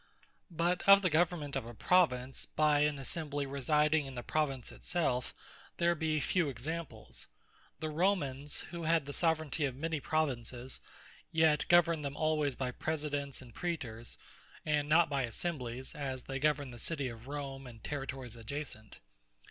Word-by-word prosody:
But 175 +1 +1
of 200 0 +9
the 180 - +3
government 160 -3 +1
of 115 - -2
a 120 - -8
Province, 130 -4 +2
by 150 -1 +3
an 150 -1 +2
Assembly 145 +1 -3
residing 150 +2 +2
in 135 - -8
the 120 - -4
Province 135 -5 -1
it - - -14
selfe, 135 -8 0 0.5
there 170 0 +4
be 155 -2 0
few 165 +2 +2
examples. 125 - -5 0.5
The 155 0 -2
Romans 150 -5 0
who 170 -1 -5
had 165 -2 +2
the 145 - -6
Soveraignty 160 -2 +1
of 130 - -5
many 160 +2 -2
Provinces; 130 -5 -2 0.5
yet 160 -2 +4
governed 170 -2 +5
them 140 0 -3
alwaies 155 -4 +1
by 130 -2 -1
Presidents, 145 -2 -2
and 120 -3 -14
Praetors; 120 -10 -4 0.5
and 150 -1 +1
not 165 +2 +6
by 140 -2 0
Assemblies, 125 -1 -3
as 135 -3 -4
they 135 0 -4
governed 145 -3 +1
the 120 - -9
City 145 0 -2
of 115 0 -8
Rome, 135 -2 -5
and 115 -3 -12
Territories 135 -4 -4
adjacent. 115 -2 -6
145 Hz, 155 wpm, -33 LUFS, 130-160 Hz, 0.5 s, of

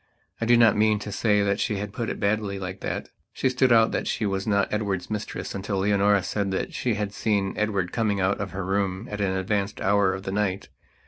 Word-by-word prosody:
I 115 - 0
do 120 0 +6
not 115 -3 +6
mean 110 0 +3
to 105 0 -6
say 105 0 +2
that 100 +1 0
she 105 -1 -1
put 110 +3 -4
it - - -4
baldly, 100 -1 0
like 95 0 -6
that. - - -4 0.2
She 130 - +1
stood 130 0 +2
out 115 -1 +5
that - - -2
she 110 - -1
was 95 0 -2
not 100 -1 +1
Edward's 100 -3 -2
mistress 105 0 -4
until 100 0 -3
Leonora 100 0 +3
said 100 +1 -1
that 95 - -2
she 120 -4 -1
had 105 -1 -3
seen 100 -4 0
Edward 100 -4 -1
coming 105 -4 0
out 95 +1 +1
of 100 - -3
her 95 -1 -5
room 95 +2 -1
at 105 0 -3
an 95 -2 +1
advanced 100 +1 -1
hour 100 -1 +3
of 95 - -7
the 95 - -4
night. 100 -1 -1
100 Hz, 230 wpm, -25 LUFS, 95-105 Hz, 0.2 s, do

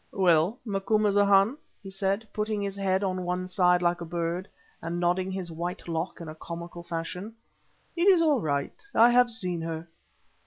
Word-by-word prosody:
"Well, 180 +2 +3
Macumazahn," 205 +2 +3 0.3
he 195 - -8
said, 195 +3 -1
putting 215 0 -1
his 200 -1 -3
head 195 0 0
on 185 -1 -1
one 180 +1 -2
side 180 -1 +3
like 175 0 +1
a - - -2
bird, 170 +2 -3 0.3
and 170 +1 -3
nodding 180 +2 +1
his 185 -3 -4
white 175 +3 -5
lock 165 +1 -3
in 170 - -8
a 155 - -6
comical 170 +2 -8
fashion, 175 +5 -5 0.6
"it 345 +2 +2
is 380 -3 +7
all 300 -7 +3
right; 140 -3 -2
I 235 +2 +7
have 245 0 +5
seen 180 -7 -2
her." 165 0 -5
185 Hz, 170 wpm, -27 LUFS, 170-205 Hz, 0.6 s, is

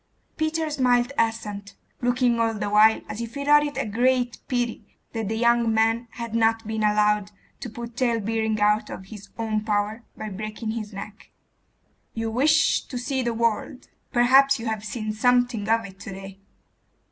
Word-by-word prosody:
Peter 315 0 -1
smiled 250 -3 +2
assent, 210 -3 -2 0.3
looking 245 -1 +2
all 225 -1 +1
the 205 -1 -3
while 215 +1 +5
as 215 - -5
if 235 +2 -7
he 280 0 -4
thought 295 +1 +6
it 290 -2 -4
a 275 - -1
great 245 +3 +1
pity 240 -3 -2 0.3
that 225 -3 -3
the 220 - -2
young 235 0 +3
man 225 +2 +1
had 235 -2 -6
not 225 0 +2
been 220 0 -3
allowed 210 -1 +2 0.3
to 245 - -6
put 235 +1 -8
talebearing 225 -3 0
out 210 +1 +2
of 190 - -8
his 205 0 -11
own 220 -2 -1
power 210 +1 -1
by 215 - -5
breaking 215 +2 -5
his 220 -2 -5
neck. 205 +1 -9 0.9
'You 225 0 -2
wish 305 +7 +3
to 255 - -6
see 260 +2 -2
the 235 -2 -1
world. 230 +2 -1 0.2
Perhaps 270 +3 +5
you 230 - -6
have 220 -2 -2
seen 215 0 -4
something 245 -1 +1
of 225 0 +2
it 190 -1 -12
to 220 - -8
day. 195 0 -9
225 Hz, 175 wpm, -24 LUFS, 215-245 Hz, 0.9 s, thought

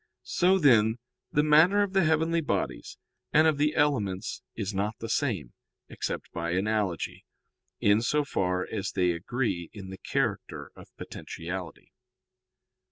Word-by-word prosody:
So, 185 +2 +3
then, 115 - +4 0.3
the 150 - +3
matter 165 +7 +5
of 200 -1 -3
the 190 -2 +4
heavenly 160 +1 +2
bodies 145 - -3 0.3
and 155 +1 +5
of 155 -3 +2
the 150 +1 +2
elements 110 -10 0
is 100 -2 -3
not 105 +3 -2
the 115 - -6
same, 100 - -1 0.4
except - - -4
by 85 0 -3
analogy, 100 -2 -1 0.6
in 105 +2 +4
so 150 +5 +1
far 90 -7 0
as 105 -4 -4
they 90 -2 +2
agree 90 0 -2
in 95 -3 -9
the 95 - -9
character - - -2
of - - -13
potentiality. 90 +1 -7
110 Hz, 140 wpm, -28 LUFS, 95-150 Hz, 0.6 s, matter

